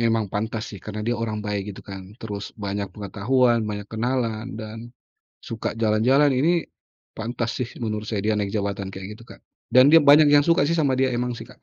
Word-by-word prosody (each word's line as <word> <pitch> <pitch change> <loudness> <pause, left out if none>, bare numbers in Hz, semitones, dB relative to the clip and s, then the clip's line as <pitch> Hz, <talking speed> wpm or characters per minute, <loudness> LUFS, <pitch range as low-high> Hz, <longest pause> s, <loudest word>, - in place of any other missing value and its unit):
memang 115 -2 +2
pantas 110 +1 -2
sih 100 - -9
karena 105 0 -5
dia 120 - +1
orang 110 -2 -2
baik 105 -1 -2
gitu - - -9
kan, 95 -1 -8 0.2
terus 105 -3 -5 0.2
banyak 100 0 -3
pengetahuan, 120 +4 +1
banyak 105 -1 -4
kenalan, 115 -1 -1
dan 110 +1 -7 0.7
suka 115 -2 -3
jalan-jalan. 125 +7 +4
Ini 140 +7 +2 0.6
pantas 115 +1 -3
sih 125 - -2 0.2
menurut 105 -1 -3
saya 105 -3 -1
dia 110 - +2
naik 100 -1 -2
jabatan 100 -1 -3
kayak 95 0 -7
gitu, 115 - -15
Kak. - - -13 0.3
Dan 130 +3 +7
dia 165 - +9
banyak 145 +1 +7
yang 145 -1 +6
suka 170 +3 +3
sih 170 - +1
sama 145 -5 +2
dia, 130 -1 +1
emang 125 +1 -1
sih - - -8
Kak. - - -18
115 Hz, 200 wpm, -23 LUFS, 105-130 Hz, 0.7 s, dia